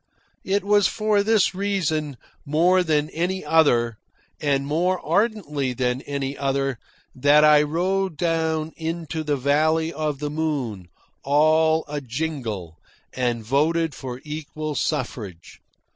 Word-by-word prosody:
It 200 +1 0
was 205 0 +4
for 215 -1 +1
this 215 -2 +2
reason, 165 -8 -1 0.3
more 175 +6 +3
than 150 -3 +1
any 180 +1 -2
other, 120 -8 +3 0.4
and 140 -2 +1
more 175 +5 0
ardently 160 - 0
than 125 0 -1
any 140 -1 -4
other, 135 -2 -1 0.3
that 145 +3 +5
I 150 -1 +7
rode 180 +3 -1
down 160 -2 0
into 160 -1 -4
the 150 -2 0
Valley 155 +4 +1
of 155 -2 -2
the 145 +1 -4
Moon, 140 - -3 0.4
all 155 +3 +3
a 145 0 -4
jingle, 120 - -4 0.3
and 120 -3 -1
voted 160 +5 +1
for 125 -1 -7
equal 155 0 -5
suffrage. 115 - -4
150 Hz, 125 wpm, -23 LUFS, 135-165 Hz, 0.4 s, I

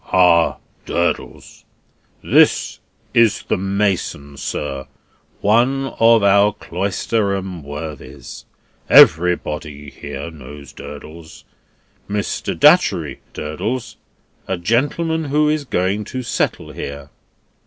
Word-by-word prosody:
"Ah, 90 -2 +4 0.3
Durdles! 85 0 -3 0.6
This - - +3 0.3
is 115 -3 +3
the - - -1
mason, 95 -7 -2
sir; 70 -1 -5 0.5
one 125 +6 +2
of 115 -1 +5
our 100 +1 +4
Cloisterham 95 -1 -2
worthies; 75 +1 -8 0.4
everybody 75 -3 +4
here 70 +3 -7
knows 75 -1 -12
Durdles. 75 +3 -11 0.7
Mr. 105 0 -3
Datchery, - - +4 0.2
Durdles 105 +12 -4 0.5
a 95 - -1
gentleman 145 - 0
who 150 +2 +2
is 150 -1 -1
going 95 -1 -1
to 130 +4 -5
settle 115 - -2
here." 70 0 -7
95 Hz, 90 wpm, -19 LUFS, 75-115 Hz, 0.7 s, of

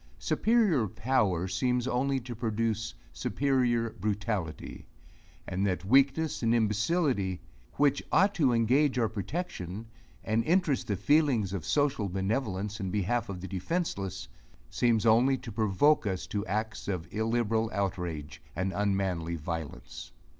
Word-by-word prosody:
Superior 210 - +2
power 105 -5 0
seems 125 +6 0
only 135 +2 +1
to 120 0 -7
produce 110 - -2 0.2
superior 120 - +1
brutality; 105 -6 -3 0.6
and 95 +2 -2
that 90 -1 -2
weakness 140 +7 +3
and 115 0 +2
imbecility, 105 - +1 0.3
which 145 -1 +2
ought 200 +1 +4
to 145 -9 +3
engage 125 +4 +3
our 115 -2 +3
protection, 105 - -5 0.4
and 110 +1 +1
interest 165 -2 +1
the 100 - 0
feelings 130 - +2
of 95 -5 -3
social 140 -9 +1
benevolence 100 +1 -2
in 95 -2 -3
behalf 105 +3 -1
of 90 -2 -5
the 95 - -5
defenceless, 100 - -3 0.4
seems 115 -2 +2
only 120 +4 +4
to 120 - -9
provoke 110 +6 +2
us 95 -2 -2
to 100 -1 -3
acts 110 +2 -3
of 90 -4 -3
illiberal 110 0 0
outrage 90 -6 -3
and 95 +3 -1
unmanly 95 -5 -1
violence. 80 -4 -6
110 Hz, 130 wpm, -29 LUFS, 95-130 Hz, 0.6 s, ought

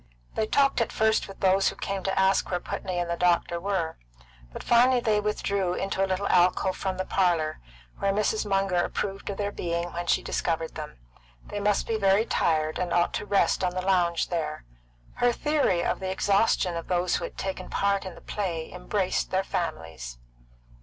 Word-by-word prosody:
They 215 - 0
talked 275 +1 +3
at 230 - 0
first 220 0 +2
with 195 - -12
those 195 0 +4
who - - -8
came 195 -1 -3
to 195 0 0
ask 190 0 +3
where 180 - 0
Putney 180 +1 -4
and 175 0 -1
the 170 - -1
doctor 170 -1 +1
were; 180 -3 -2 0.5
but - - -8
finally 245 +2 +5
they 215 -3 +1
withdrew 200 -3 -1
into 195 0 -1
a - - +1
little 190 +2 0
alcove 180 +1 +3
from 190 -1 -3
the 185 - -2
parlour, 170 -5 +1 0.4
where 195 - +1
Mrs. 210 +1 +1
Munger 195 -3 +1
approved 195 0 -3
of 200 - -4
their 205 0 -1
being 170 -2 -3
when 175 0 -4
she - - +2
discovered 165 -1 -2
them; 150 - -7 0.5
they 205 - -5
must 205 0 +1
be 225 - -1
very 200 +2 +4
tired, 155 -5 0
and 180 -1 -2
ought 175 0 +2
to 210 - -3
rest 200 -1 +2
on 180 0 0
the 185 - -1
lounge 175 -3 +2
there. 155 - -3 0.5
Her 245 0 +3
theory 285 - +1
of - - -1
the 190 - -3
exhaustion 195 -1 +2
of 165 - -5
those 180 0 +1
who - - -6
had - - -10
taken 190 -1 -4
part 200 0 +1
in 185 -2 -7
the - - -14
play 170 -6 -3
embraced 185 +1 -1
their 190 +1 +1
families. 80 - -4
190 Hz, 195 wpm, -27 LUFS, 175-200 Hz, 0.5 s, finally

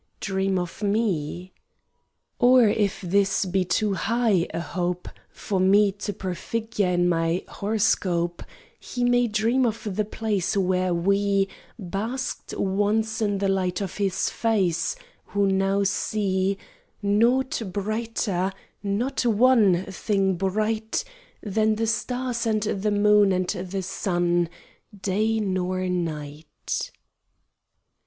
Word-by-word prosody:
Dream 190 -1 0
of 175 +2 -4
me. 190 -5 -1 0.9
Or 245 -1 +6
if 205 -1 0
this 195 +2 +1
be 185 +1 +1
too 205 +3 0
high 220 -3 +1
A - - -3
hope 180 +1 -3 0.2
For 195 -2 -3
me 200 +2 +5
to 205 +1 -5
prefigure 200 +2 -2
in 175 0 +2
my 165 0 +1
Horoscope, 190 -5 0 0.4
He 245 - -4
may 245 0 +3
dream 225 +4 +1
of 220 -4 -2
the 215 - +1
place 205 -3 -1
Where 185 -1 +1
we 195 +2 +2 0.3
Basked 220 +7 -4
once 215 +3 0
in 205 -2 +1
the 195 0 0
light 185 -2 0
of 195 -3 -4
his 195 -2 0
face, 195 - 0 0.3
Who 200 0 +1
now 195 +1 +2
see 195 -1 0 0.5
Nought 235 +6 +2
brighter, 205 -2 -1 0.3
not 215 +8 -1
one 220 -5 +4
Thing 195 0 +1
bright, 215 +4 -1 0.4
Than 215 +1 +1
the 225 +1 0
stars 240 +1 -1
and 215 -2 +1
the 210 -1 -1
moon 205 -1 +4
and 185 -1 0
the 190 0 -3
sun, 175 -2 0 0.5
Day 215 +3 +1
nor 185 -2 -1
night. 155 -4 -4
200 Hz, 120 wpm, -25 LUFS, 185-220 Hz, 0.9 s, Or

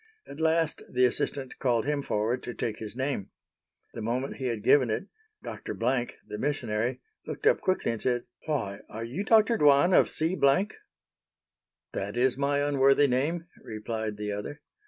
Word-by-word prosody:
At 140 - -10
last 160 0 +1
the 125 0 +4
assistant 130 +2 -1
called 120 -4 +1
him 145 0 0
forward 115 0 -1
to 120 - -6
take 110 -2 -3
his 110 0 -7
name. 130 -6 -2 0.6
The 115 - -6
moment 125 +5 -2
he 130 - -2
had 115 -4 -3
given 130 0 +5
it, 110 - -1 0.4
Dr. - - -6
Blank, 120 +1 0
the 105 - -7
missionary, 120 -4 -1 0.3
looked - - -6
up 475 - +4
quickly 185 -9 +1
and 115 - -5
said, 120 -1 0 0.2
"Why, 115 -10 -2
are 110 +1 -6
you 130 - -3
Dr. 225 +1 +4
Dwan 145 +5 +5
of - - +5
C——?" 165 +4 0 1.6
"That 100 +4 -4
is 125 +1 +4
my 140 +1 +1
unworthy 140 0 +4
name," 150 +7 0 0.2
replied 110 -1 -4
the 105 0 -3
other. 105 +9 -5
130 Hz, 165 wpm, -28 LUFS, 115-145 Hz, 1.6 s, given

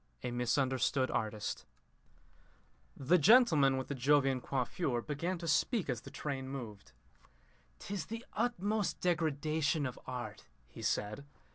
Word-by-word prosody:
A 125 - -2
MISUNDERSTOOD 130 +2 +1
ARTIST 110 -1 -2 1.3
The 165 +7 +3
gentleman 155 - +6
with 130 - -3
the - - -3
Jovian 135 0 +3
coiffure 130 +1 -1
began 165 +5 -2
to 170 0 -6
speak 180 - +1
as 120 -2 -4
the - - -10
train 135 -3 -4
moved. 105 - -8 0.8
"'Tis 200 -4 -5
the 230 +2 -6
utmost 215 -3 0
degradation 155 -2 0
of 130 - -5
art," 120 -5 -6 0.2
he - - -11
said. 105 +6 -1
140 Hz, 125 wpm, -34 LUFS, 125-170 Hz, 1.3 s, gentleman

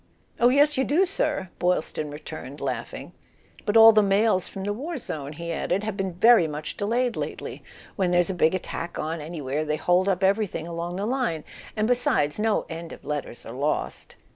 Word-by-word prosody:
"Oh, 240 - +6
yes, 290 +2 +4
you - - +4
do, 320 +8 +3
sir 300 - -2
!" - - -35
Boylston 175 -4 0
returned, 145 -1 -8
laughing; 135 -2 -5 0.5
"but 210 +2 +4
all 225 0 +10
the 215 - +6
mails 200 -1 +2
from 195 - -7
the 205 +1 -1
war 295 +10 -5
zone," 150 - -6
he 170 +2 -5
added, 185 +4 -1
"have 215 -2 -3
been 190 -2 -2
very 225 -1 +6
much 150 0 -5
delayed 235 +4 0
lately. - - -5 0.3
When 190 -3 +1
there's 175 +1 +2
a - - -3
big 170 0 +3
attack 170 -2 -5
on 160 +1 -3
anywhere 150 -2 -3
they 150 0 -1
hold 180 +4 +2
up 190 0 0
everything 195 -4 +1
along 170 +1 -4
the 195 +2 -2
line. 235 - -1 0.3
And 215 0 +2
besides, 220 -11 +1
no 220 0 +1
end 165 0 -7
of - - -13
letters 145 -5 -5
are 115 - -8
lost." 145 +4 -2
185 Hz, 195 wpm, -25 LUFS, 155-225 Hz, 0.5 s, all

